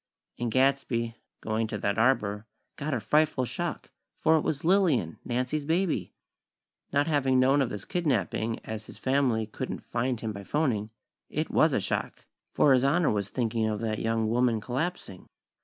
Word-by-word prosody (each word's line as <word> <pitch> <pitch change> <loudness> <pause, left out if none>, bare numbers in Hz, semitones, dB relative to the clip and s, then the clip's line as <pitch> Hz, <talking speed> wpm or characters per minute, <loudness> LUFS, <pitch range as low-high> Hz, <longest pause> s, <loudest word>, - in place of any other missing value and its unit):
And 120 - -1
Gadsby, 130 -3 +1 0.3
going 110 +1 -1
to 105 - -4
that 100 +1 -1
arbor, 110 -4 +1 0.3
got 150 0 -2
a - - -1
frightful 150 +2 +2
shock; 175 +6 -4 0.3
for 160 - +4
it 155 - +3
was 145 -1 -2
Lillian, 165 - +2
Nancy's 125 +5 -1
baby! 170 +3 0 0.8
Not 145 +1 +2
having 135 -4 +2
known 135 +3 +4
of 130 - +1
this 105 -1 -6
"kidnapping" 115 - -1
as 110 -1 -6
his - - -11
family 130 -5 +1
couldn't 105 - -6
find 120 0 -1
him 110 -1 -3
by 100 0 -7
phoning, 115 -5 0 0.4
it - - -2
was - - +4
a - - +2
shock; - - -3 0.3
for 140 - +4
His 130 -1 +3
Honor 150 +4 +3
was 100 -2 -1
thinking 115 -3 0
of 105 -1 -2
that 110 -2 -1
young 115 -1 0
woman 120 0 +2
collapsing. 130 - -4
125 Hz, 170 wpm, -28 LUFS, 110-145 Hz, 0.8 s, for